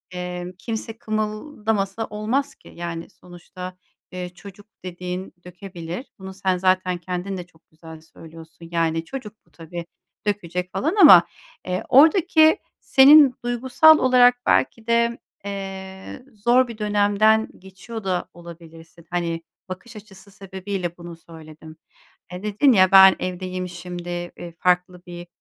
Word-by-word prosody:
ımm, 180 Hz, 0 st, -6 dB
kimse 225 Hz, +3 st, -6 dB
kımıldamasa 215 Hz, -1 st, -3 dB
olmaz 220 Hz, +7 st, -2 dB
ki. -, -, -18 dB
Yani, 170 Hz, -1 st, -6 dB
sonuçta, 180 Hz, 0 st, -11 dB, 0.4 s
ııı, 180 Hz, -1 st, -5 dB
çocuk 200 Hz, +2 st, -14 dB, 0.2 s
dediğin 180 Hz, +1 st, -6 dB
dökebilir. 180 Hz, +3 st, -9 dB
Bunu 190 Hz, 0 st, -9 dB
sen 190 Hz, -1 st, -1 dB
zaten 185 Hz, -1 st, +1 dB
kendin 180 Hz, +2 st, -5 dB
de 180 Hz, -, -7 dB
çok 165 Hz, -2 st, -30 dB
güzel 160 Hz, 0 st, -13 dB
söylüyorsun. 165 Hz, +1 st, -14 dB
Yani, 165 Hz, -1 st, -1 dB
çocuk 250 Hz, -1 st, -8 dB
bu -, -, -31 dB
tabii, 165 Hz, +2 st, -9 dB, 0.4 s
dökecek 180 Hz, -3 st, -3 dB
falan 315 Hz, +8 st, -1 dB
ama, 180 Hz, -, +9 dB, 0.4 s
eee, 180 Hz, 0 st, -2 dB
oradaki 315 Hz, +3 st, +5 dB, 0.2 s
senin 275 Hz, -1 st, +6 dB
duygusal 260 Hz, +6 st, +4 dB
olarak 245 Hz, -1 st, +4 dB
belki 230 Hz, -3 st, +1 dB
de, 235 Hz, 0 st, +1 dB, 0.3 s
eee, 195 Hz, +2 st, -8 dB
zor 240 Hz, +4 st, +2 dB
bir 230 Hz, -2 st, -9 dB
dönemden 210 Hz, +1 st, +2 dB
geçiyor 190 Hz, +4 st, -10 dB
da 185 Hz, -2 st, -2 dB
olabilirsin. 165 Hz, -1 st, -14 dB
Hani, 170 Hz, -1 st, -3 dB, 0.3 s
bakış 205 Hz, +6 st, -9 dB
açısı 200 Hz, -1 st, -14 dB
sebebiyle 190 Hz, -2 st, -6 dB
bunu 170 Hz, -1 st, -10 dB
söyledim. 160 Hz, -1 st, -14 dB, 0.5 s
Hani 180 Hz, +2 st, -9 dB
dedin 215 Hz, +7 st, +2 dB
ya, 185 Hz, -5 st, +4 dB
ben 190 Hz, -1 st, +8 dB
evdeyim 185 Hz, 0 st, -5 dB
şimdi, 175 Hz, 0 st, -8 dB, 0.3 s
e, 170 Hz, -, -9 dB
farklı 180 Hz, 0 st, 0 dB
bir, 175 Hz, 0 st, -9 dB
185 Hz, 130 wpm, -22 LUFS, 175-215 Hz, 0.5 s, ama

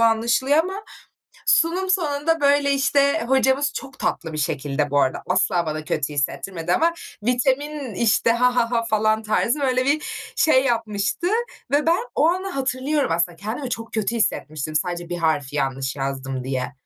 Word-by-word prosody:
anlaşılıyor 235 Hz, +5 st, +3 dB
ama 380 Hz, +5 st, -1 dB, 0.6 s
sunum 360 Hz, +3 st, +2 dB
sonunda, 325 Hz, -3 st, +1 dB
böyle, 285 Hz, 0 st, +3 dB
işte, 280 Hz, +1 st, +2 dB
hocamız 265 Hz, +2 st, +2 dB
çok 270 Hz, -1 st, -8 dB
tatlı 160 Hz, -2 st, -2 dB
bir 155 Hz, -, -5 dB
şekilde 145 Hz, 0 st, -1 dB
bu 145 Hz, 0 st, +3 dB
arada, 130 Hz, -, 0 dB
asla 180 Hz, -1 st, +1 dB
bana 155 Hz, 0 st, -3 dB
kötü 150 Hz, -1 st, -2 dB
hissettirmedi 165 Hz, +4 st, -2 dB
ama, 330 Hz, -, +3 dB, 0.3 s
"Vitemin" 260 Hz, +2 st, 0 dB
işte, 220 Hz, +2 st, +2 dB
"Ha 250 Hz, +1 st, +2 dB
ha 235 Hz, -1 st, +2 dB
ha!" 230 Hz, -1 st, +1 dB
falan 215 Hz, 0 st, +2 dB
tarzı, 230 Hz, +6 st, 0 dB
böyle, 255 Hz, -2 st, +1 dB
bir 290 Hz, +2 st, +1 dB, 0.3 s
şey 265 Hz, -4 st, +4 dB
yapmıştı 225 Hz, -, -1 dB, 0.4 s
ve 290 Hz, +2 st, +2 dB
ben 340 Hz, +8 st, +2 dB
o -, -, +3 dB
anı 370 Hz, +3 st, -1 dB
hatırlıyorum 270 Hz, -, -1 dB
aslında. 170 Hz, +1 st, 0 dB
Kendimi 225 Hz, -, -5 dB
çok 225 Hz, -1 st, -5 dB
kötü 220 Hz, +1 st, -1 dB
hissetmiştim 155 Hz, -8 st, -2 dB
sadece 175 Hz, +2 st, -2 dB
bir 175 Hz, -, -3 dB
harfi 150 Hz, -4 st, 0 dB
yanlış 135 Hz, -1 st, -2 dB
yazdım 135 Hz, -1 st, -4 dB
diye. 130 Hz, 0 st, -3 dB
230 Hz, 160 wpm, -22 LUFS, -, 0.6 s, şey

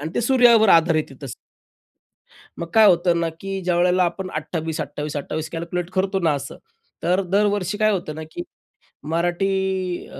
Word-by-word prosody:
आणि 155 Hz, +3 st, -6 dB
ते -, -, +1 dB
सूर्यावर 235 Hz, -3 st, +5 dB
आधारित 165 Hz, -2 st, +4 dB
आहे 135 Hz, +2 st, -16 dB
तसं. 125 Hz, -, -7 dB, 1.2 s
मग 170 Hz, -, -4 dB
काय 220 Hz, -1 st, +7 dB
होतं 175 Hz, -1 st, +3 dB
ना, 165 Hz, -, 0 dB
की 195 Hz, 0 st, -4 dB
ज्यावेळेला 180 Hz, +1 st, +2 dB
आपण 185 Hz, +2 st, -3 dB
28-28-28 155 Hz, -1 st, -4 dB
कॅल्क्युलेट 170 Hz, +1 st, -4 dB
करतो 190 Hz, +1 st, 0 dB
ना 160 Hz, -3 st, +2 dB
असं, 140 Hz, -1 st, -6 dB, 0.5 s
तर 180 Hz, +3 st, +2 dB
दरवर्षी 205 Hz, 0 st, +1 dB
काय 215 Hz, 0 st, +3 dB
होतं 170 Hz, -5 st, -3 dB
ना, 160 Hz, -, -7 dB
की 175 Hz, -, -5 dB, 0.7 s
मराठी 175 Hz, +3 st, 0 dB, 0.6 s
अ, -, -, -10 dB
175 Hz, 155 wpm, -22 LUFS, 160-195 Hz, 1.2 s, काय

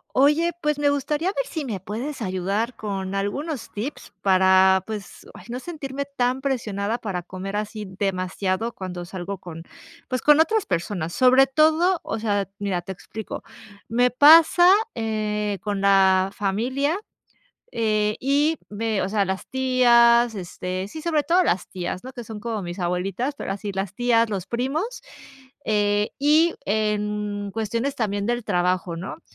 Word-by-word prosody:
Oye, 300 Hz, +6 st, +4 dB
pues 300 Hz, -1 st, 0 dB
me 290 Hz, -1 st, +2 dB
gustaría 295 Hz, +5 st, -1 dB
ver -, -, -2 dB
si 315 Hz, -4 st, -4 dB
me 215 Hz, -7 st, -4 dB
puedes 235 Hz, +9 st, -5 dB
ayudar 200 Hz, +4 st, -2 dB
con 195 Hz, -2 st, -4 dB
algunos 250 Hz, +7 st, -3 dB
tips 230 Hz, +8 st, -6 dB
para, 190 Hz, 0 st, +5 dB
pues, 215 Hz, -2 st, -8 dB
ay, -, -, -13 dB
no 245 Hz, +2 st, -4 dB
sentirme 280 Hz, -3 st, -5 dB
tan 255 Hz, -2 st, -1 dB
presionada 230 Hz, -5 st, -2 dB
para 185 Hz, -5 st, -4 dB
comer 190 Hz, +3 st, -6 dB
así 210 Hz, 0 st, -4 dB
demasiado 190 Hz, +3 st, -1 dB
cuando 180 Hz, -2 st, -6 dB
salgo 185 Hz, +1 st, -6 dB
con, 165 Hz, -3 st, -9 dB, 0.5 s
pues 255 Hz, -2 st, -1 dB
con 295 Hz, +3 st, +5 dB
otras 435 Hz, +6 st, +2 dB
personas, 170 Hz, -1 st, -2 dB
sobre 260 Hz, +1 st, +5 dB
todo 315 Hz, +6 st, +3 dB
o -, -, -3 dB
sea, 205 Hz, -3 st, 0 dB
mira, 195 Hz, -4 st, -2 dB
te 190 Hz, -, -7 dB
explico. 215 Hz, +3 st, -7 dB, 0.5 s
Me 245 Hz, +2 st, +3 dB
pasa, 325 Hz, +6 st, +7 dB, 0.2 s
eh, 210 Hz, -2 st, -2 dB
con 205 Hz, -2 st, -2 dB
la 190 Hz, -1 st, +4 dB
familia, 245 Hz, -, -1 dB, 0.8 s
eh, 215 Hz, -2 st, 0 dB
y 290 Hz, +4 st, +2 dB
ve, 215 Hz, 0 st, -1 dB
o -, -, 0 dB
sea, 205 Hz, 0 st, +1 dB
las 190 Hz, -1 st, -4 dB
tías, 240 Hz, -3 st, +4 dB
este 185 Hz, 0 st, -5 dB
sí, 315 Hz, -, -8 dB
sobre 315 Hz, -2 st, +1 dB, 0.2 s
las 180 Hz, +1 st, 0 dB
tías, 180 Hz, 0 st, -5 dB
¿no?, 260 Hz, -, -8 dB
que 245 Hz, -2 st, -8 dB
son 215 Hz, -1 st, -8 dB
como 225 Hz, -2 st, -3 dB
mis 175 Hz, +1 st, -6 dB
abuelitas, 180 Hz, +9 st, -1 dB
pero -, -, -3 dB
así, 205 Hz, +1 st, -5 dB
las 195 Hz, 0 st, -4 dB
tías, 230 Hz, -1 st, +2 dB
los 195 Hz, -3 st, -3 dB
primos, 300 Hz, -, -3 dB, 0.6 s
eh, 205 Hz, 0 st, +1 dB
y 310 Hz, +4 st, +4 dB
en 210 Hz, -1 st, -1 dB
cuestiones 230 Hz, +5 st, -2 dB
también 205 Hz, -3 st, -1 dB
del 240 Hz, +1 st, -1 dB
trabajo, 180 Hz, -2 st, 0 dB
¿no?, 170 Hz, -2 st, -7 dB
215 Hz, 155 wpm, -23 LUFS, 195-260 Hz, 0.8 s, pasa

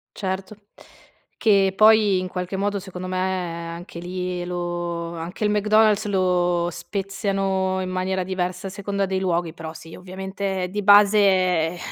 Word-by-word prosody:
Certo 190 Hz, +1 st, -4 dB, 0.8 s
che 195 Hz, -3 st, +4 dB
poi 215 Hz, -2 st, +5 dB
in 185 Hz, -, -3 dB
qualche 180 Hz, +1 st, -4 dB
modo, 200 Hz, +1 st, -1 dB
secondo 185 Hz, -1 st, -7 dB
me, 185 Hz, -2 st, -2 dB
anche 170 Hz, +1 st, -8 dB
lì 180 Hz, 0 st, -4 dB
lo 175 Hz, -1 st, -4 dB
anche 170 Hz, +6 st, -4 dB
il -, -, +2 dB
McDonald's 210 Hz, 0 st, +3 dB
lo 180 Hz, -3 st, +1 dB
speziano 195 Hz, 0 st, -2 dB
in 185 Hz, -, -3 dB
maniera 185 Hz, 0 st, -1 dB
diversa 185 Hz, 0 st, -3 dB
a -, -, -5 dB
seconda 200 Hz, 0 st, -2 dB
dei 190 Hz, 0 st, -1 dB
luoghi, 175 Hz, -3 st, -1 dB
però 160 Hz, -1 st, -7 dB
sì, 165 Hz, 0 st, -11 dB
ovviamente 190 Hz, 0 st, -4 dB
di 205 Hz, +2 st, -3 dB
base 205 Hz, +1 st, +7 dB
è 180 Hz, -4 st, +2 dB
185 Hz, 145 wpm, -23 LUFS, 180-195 Hz, 0.8 s, base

